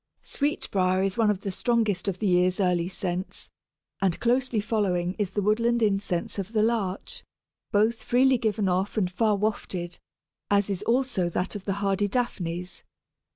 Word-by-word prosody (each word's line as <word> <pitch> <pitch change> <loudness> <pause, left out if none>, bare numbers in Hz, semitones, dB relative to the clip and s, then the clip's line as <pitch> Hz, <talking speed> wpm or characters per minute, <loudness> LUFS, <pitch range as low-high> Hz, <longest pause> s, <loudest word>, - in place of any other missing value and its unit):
Sweetbriar 190 -10 0
is 195 -1 0
one 225 -2 +3
of 205 -2 0
the 195 - -3
strongest 215 -2 0
of 190 -2 -1
the 215 - -3
year's 180 0 +3
early 180 -3 +2
scents, 185 0 -4 0.5
and 190 -3 +1
closely 245 -1 +1
following 190 -5 0
is 205 -3 0
the 205 - -2
woodland 230 +3 +2
incense 195 -3 0
of 195 +3 -5
the 215 -1 +3
Larch, 215 -5 -2 0.5
both 220 +2 +2
freely 260 +1 +3
given 215 -3 0
off 190 +4 0
and 185 -4 +1
far 210 +3 +2
wafted, 190 -4 -3 0.5
as 200 0 +2
is 190 -1 -2
also 235 -6 +1
that 180 +4 -2
of 200 - -7
the 195 - 0
hardy 195 +1 +1
Daphnes. 180 -6 -3
200 Hz, 160 wpm, -26 LUFS, 185-220 Hz, 0.5 s, one